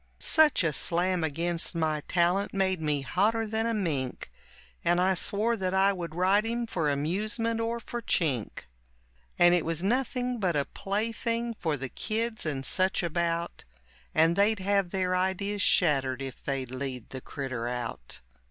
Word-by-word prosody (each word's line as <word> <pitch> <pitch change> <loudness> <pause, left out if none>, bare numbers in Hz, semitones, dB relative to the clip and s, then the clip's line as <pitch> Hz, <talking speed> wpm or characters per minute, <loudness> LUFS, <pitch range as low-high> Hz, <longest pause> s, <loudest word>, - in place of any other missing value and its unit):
Such 310 - +4
a 160 -2 +1
slam 175 +3 +1
against 165 +3 -2
my 155 -2 0
talent 180 +4 +1
made 190 -3 +1
me 150 -2 0
hotter 210 - +1
than 220 +1 -1
a 230 - 0
mink, 145 -11 -2 0.5
And 175 +1 +3
I 185 +1 +3
swore 210 +5 +1
that 190 -3 -2
I 195 +1 +4
would 170 -4 -6
ride 190 +4 +3
him 235 +1 -2
for 165 -9 -1
amusement 215 +10 -1
or 230 +1 -1
for 240 +1 -6
chink. 140 - -1 0.8
And 175 0 +6
it 175 -3 +2
was 165 +1 -3
nothing 250 +2 0
but 180 -5 0
a 140 -1 +1
plaything 230 +3 -2
for 160 -8 -2
the 135 0 -4
kids 220 - -2
and 135 -3 -3
such 185 +6 +2
about, 170 0 -2 0.5
And 165 +2 +4
they'd 205 +3 +3
have 195 -1 +1
their 185 0 0
ideas 190 +2 -1
shattered 135 -8 +2
if 135 -2 -7
they'd 135 -3 -3
lead 130 -2 -5
the 130 - -6
critter 130 -5 -4
out. 120 - -5
180 Hz, 160 wpm, -28 LUFS, 150-210 Hz, 0.8 s, And